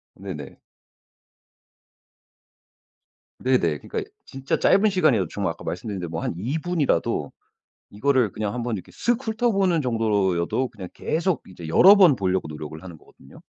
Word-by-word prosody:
네네. 85 -8 -8 2.8
네네 85 - +1
그러니까 - - -4 0.2
진짜 135 0 -3
짧은 205 +2 +4
시간이에요. 145 - +2
정말 95 -2 -2
아까 80 - -11
말씀드렸는데 90 -1 -4
뭐 80 0 -4
한 - - -2
2 125 - -2
분이라도 160 - 0 0.6
이거를 125 0 +1
그냥 105 0 -3
한번 120 -2 -2
이렇게 90 - -10
쓱 240 +1 0
훑어보는 200 - +1
정도로 105 -7 +1
여도 125 +9 -1
그냥 95 -5 -9
계속 170 -1 -1
이제 90 -3 -10
여러 190 - +8
번 180 -8 +7
보려고 95 -4 -1
노력을 75 +1 -8
하는 90 -3 -10
거거든요. 65 - -18
110 Hz, 325 characters per minute, -24 LUFS, -, 2.8 s, 여러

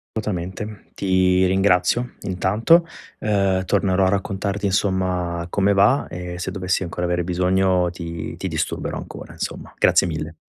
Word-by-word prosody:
Assolutamente, 105 0 -4
ti 95 -1 +2
ringrazio 95 +5 +2
intanto, 105 - +3 0.3
uhm, 100 -3 +1
tornerò 95 -1 +2
a - - +3
raccontarti 100 0 -1
insomma 90 -3 0
come 100 +2 +2
va, 110 +8 +3
e 90 0 -6
se 90 - -3
dovessi 95 -1 -1
ancora 90 +1 -3
avere 90 0 0
bisogno 90 0 +2
ti 85 -2 -6
ti - - -4
disturberò - - -3
ancora, - - -9
insomma. - - -6
Grazie - - +4
mille. 80 0 -5
95 Hz, 135 wpm, -22 LUFS, 90-100 Hz, 0.3 s, Grazie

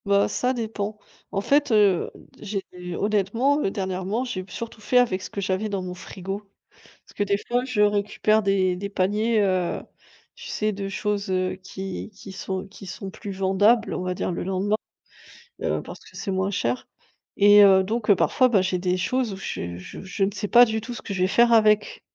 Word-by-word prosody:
Bah, 200 0 +3
ça 250 +1 0
dépend. 215 -3 -4 0.3
En 195 - -1
fait, 285 +4 +2
heu, 205 -5 +4 0.3
j'ai 200 -2 -4 0.3
honnêtement, 215 +8 +1
heu, - - +1
dernièrement, 190 +4 -2
j'ai 195 -7 -4
surtout 230 -1 -7
fait 250 - +1
avec 230 -7 +3
ce - - -7
que 200 - -4
j'avais 195 +2 -1
dans 195 -2 -2
mon 180 0 -5
frigo, 190 +2 -6 0.4
parce - - -22
que 205 - 0
des 200 0 +1
fois 245 +1 0
je 255 -5 0
récupère 210 +1 +2
des 190 -3 +1
des 200 +2 -4
paniers, 210 +3 +1
heu, 185 -3 0 0.5
tu - - -10
sais 215 0 -1
de 200 -1 -4
choses, 205 0 -2
heu, 185 0 0
qui 190 +2 -7
qui 195 -1 -11
sont 190 0 -4
qui 195 0 -13
sont 190 +2 -6
plus 200 0 -7
vendables, 205 +5 +3
on 185 - -3
va 180 0 -1
dire 180 - -2
le 170 - -3
lendemain, 195 +3 0 0.9
heu, - - 0
parce - - -10
que - - -18
c'est 200 - -4
moins 190 +1 0
cher 125 -10 -1 0.5
et 205 0 +8
heu, 190 -1 +6
donc 215 +2 +1
parfois, 255 +6 +3
bah, 215 -5 +3
j'ai 185 0 0
des 180 0 0
choses 250 +3 0
où - - -5
je 85 - -5
je 90 - -9
je 195 +1 -1
ne 195 - 0
sais 205 +1 -4
pas 240 +2 +8
du 220 -1 -2
tout 245 - -6
ce 240 - -6
que 200 - -6
je 185 - -1
vais - - +4
faire 235 +4 +4
avec 215 -1 +3
200 Hz, 205 wpm, -24 LUFS, 190-215 Hz, 0.9 s, et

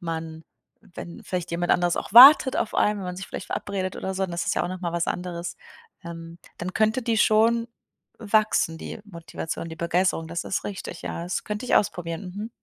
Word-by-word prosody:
man 160 -1 -6 0.5
wenn 170 0 -9
vielleicht 180 -1 -4
jemand 175 +1 0
anderes 175 -1 +1
auch - - -5
wartet 260 +2 +9
auf - - -2
einen, 210 0 +2
wenn 195 - -6
man 180 - -5
sich 190 - -7
vielleicht - - -7
verabredet 190 -2 -4
oder 190 - -4
so, 190 0 -1
das 170 -1 -3
ist - - 0
ja - - 0
auch - - -3
nochmal 180 -2 -4
was 170 0 -1
anderes. 175 -1 -4 0.5
Ähm, 165 0 -9 0.2
dann 180 +1 -5
könnte 220 +3 +2
die 230 -1 0
schon 230 +2 +3 0.5
wachsen, 215 -6 +1
die - - -8
Motivation, 165 -3 -7
die 160 - -8
Begeisterung, 170 0 0
das 170 +1 -4
ist - - -2
richtig, 185 -3 -6
ja. - - -5
Das 175 +2 -3
könnte 210 +3 -4
ich - - +2
ausprobieren, 175 -1 -1
mhm. 215 +2 -5
180 Hz, 200 wpm, -25 LUFS, 170-210 Hz, 0.5 s, wartet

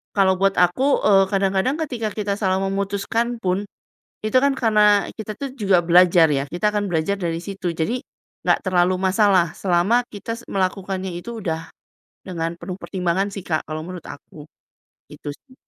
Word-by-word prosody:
kalau 190 -2 +4
buat 195 0 +2
aku, 255 +11 +2
eee, 195 -2 +5
kadang-kadang 195 +6 +1
ketika 230 -4 -3
kita 205 -2 -1
salah 190 -2 +1
memutuskan 200 +5 -1
pun, 185 0 -1 0.6
itu 215 +3 0
kan 280 +1 +3
karena 210 -4 +4
kita 215 -1 -7
tuh 275 -2 -5
juga 195 -6 +2
belajar 175 -1 +6
ya, 135 -1 0
kita 195 +7 0
akan 205 -1 -1
belajar 165 +5 0
dari 165 -2 -2
situ. 190 -1 -4
Jadi, 225 +11 -1 0.4
nggak - - +2
terlalu 185 -1 +2
masalah, 190 -2 +3
selama 195 +7 +2
kita 225 +2 -6
melakukannya 190 -1 -2
itu 230 +7 -7
udah 165 -2 -3 0.6
dengan 170 -2 -4
penuh 180 +1 -6
pertimbangan 185 0 -1
sih 195 - -6
Kak, 155 -3 -2
kalau 155 +1 -5
menurut 180 0 -8
aku. 150 +1 -11 0.6
Itu 150 0 -7
sih. 260 - -22
190 Hz, 160 wpm, -22 LUFS, 175-210 Hz, 0.6 s, belajar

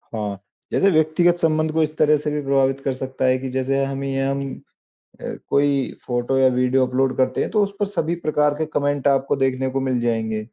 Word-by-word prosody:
हाँ। 105 -3 -4 0.3
जैसे 195 - +3
व्यक्तिगत 160 +2 +3
संबंध 155 -2 +1
को 160 0 +2
इस 155 0 -3
तरह 150 0 +4
से 150 0 -3
भी 150 - -2
प्रभावित 135 -1 +1
कर 135 - +1
सकता 130 0 -4
है 130 0 +3
कि 130 - -5
जैसे 130 +1 0
हमें 135 0 -3
हम 135 +1 -1 0.8
अ, - - -11 0.3
कोई 140 -2 +1
फ़ोटो 120 +2 -1
या 130 - +5
वीडियो 125 +1 +2
अपलोड 130 +1 0
करते 130 0 +1
हैं - - -1
तो 210 -2 +3
उस 200 - -2
पर 205 - +2
सभी 170 -4 -2
प्रकार 150 -2 +1
के 155 - -1
कॉमेंट 145 -2 -1
आपको 135 0 +2
देखने 130 -1 0
को 135 +1 -2
मिल 130 -2 0
जाएँगे। 110 -2 -1
135 Hz, 210 wpm, -21 LUFS, 130-150 Hz, 0.8 s, या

